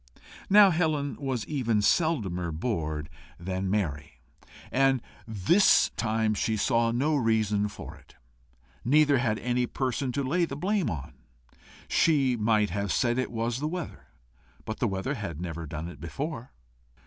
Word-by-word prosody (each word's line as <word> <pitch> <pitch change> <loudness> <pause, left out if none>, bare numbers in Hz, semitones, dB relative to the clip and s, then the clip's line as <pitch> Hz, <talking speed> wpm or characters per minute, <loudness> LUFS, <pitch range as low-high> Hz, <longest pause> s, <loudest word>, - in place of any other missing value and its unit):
Now 205 -1 +8
Helen 155 -4 0
was 130 -6 -2
even 115 -7 0
seldomer 100 - +1
bored 80 -5 -3 0.3
than 95 +2 -3
merry, 75 -8 -2 0.5
and 135 0 +3 0.3
this 110 - +4
time 110 -1 0
she 110 +1 -1
saw 115 +2 +2
no 140 +7 +1
reason 110 -5 +1
for 105 - -9
it, - - -21 0.7
neither 145 +1 +4
had 110 -3 0
any 125 +1 -1
person 130 +1 -2
to 140 - -1
lay 170 +7 +1
the 140 -4 -7
blame 190 +1 0
upon. 70 -6 -6 0.7
She 140 -6 +3
might 105 -2 +1
have 100 +1 -2
said 120 0 +1
it 130 - -2
was 115 +1 -2
the 150 - -2
weather, 175 0 -6 0.6
but 110 - -5
the 120 - +1
weather 95 +7 -2
had 100 - -5
never 85 -2 -5
done 80 +2 -5
it 75 -5 -10
before. 125 - -5
115 Hz, 150 wpm, -27 LUFS, 100-140 Hz, 0.7 s, Now